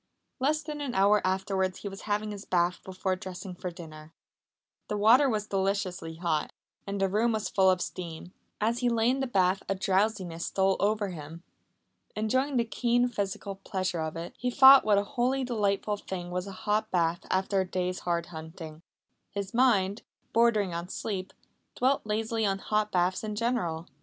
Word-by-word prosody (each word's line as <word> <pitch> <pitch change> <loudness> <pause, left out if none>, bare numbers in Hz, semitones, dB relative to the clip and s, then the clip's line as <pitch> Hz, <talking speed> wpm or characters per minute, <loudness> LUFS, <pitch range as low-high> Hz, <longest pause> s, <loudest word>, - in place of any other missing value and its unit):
Less 305 +4 +1
than 295 -1 -5
an 275 -4 -3
hour 200 +2 +4
afterwards 190 0 -1
he - - -3
was 195 0 -7
having 210 +1 0
his 205 -1 -7
bath 175 -1 +1
before 185 0 -2
dressing 185 0 -7
for 180 +1 -5
dinner. 160 -2 -11 0.7
The 210 - -2
water 240 +7 +6
was 215 -3 -1
deliciously 190 -4 -2
hot, 165 -2 -1 0.4
and 200 0 -3
the 195 - +3
room 220 +4 +1
was 215 -1 -2
full 190 -1 +4
of 185 -1 +2
steam. 175 0 -7 0.3
As 230 +3 +1
he 245 -1 +2
lay 230 +1 +2
in 265 - -1
the 270 - -1
bath 190 -4 +2
a 195 - +1
drowsiness 190 -3 0
stole 190 0 +2
over 210 0 +1
him. 165 0 -9 0.7
Enjoying 260 +6 0
the 235 - +2
keen 245 +1 +1
physical 200 -2 -4
pleasure 185 -3 -2
of 160 0 -3
it, 170 +1 -6
he 250 - 0
thought 265 +2 +9
what 210 -2 +3
a 200 - +3
wholly 255 +5 0
delightful 210 -3 0
thing 180 -3 -6
was 180 +2 -3
a - - -6
hot 210 +1 +1
bath 170 -1 +1
after 190 +1 +1
a 185 - -4
day's 180 0 -2
hard 170 -1 -1
hunting. 160 -1 -9 0.5
His 200 -1 -5
mind, 215 -5 +3 0.3
bordering 220 -5 +3
on 170 +2 -4
sleep, 190 -2 -4 0.4
dwelt 265 +2 +2
lazily 220 +1 -1
on 195 -2 +1
hot 210 +1 -1
baths 180 +2 +1
in 210 -1 -3
general. 210 -8 -1
195 Hz, 180 wpm, -29 LUFS, 180-220 Hz, 0.7 s, thought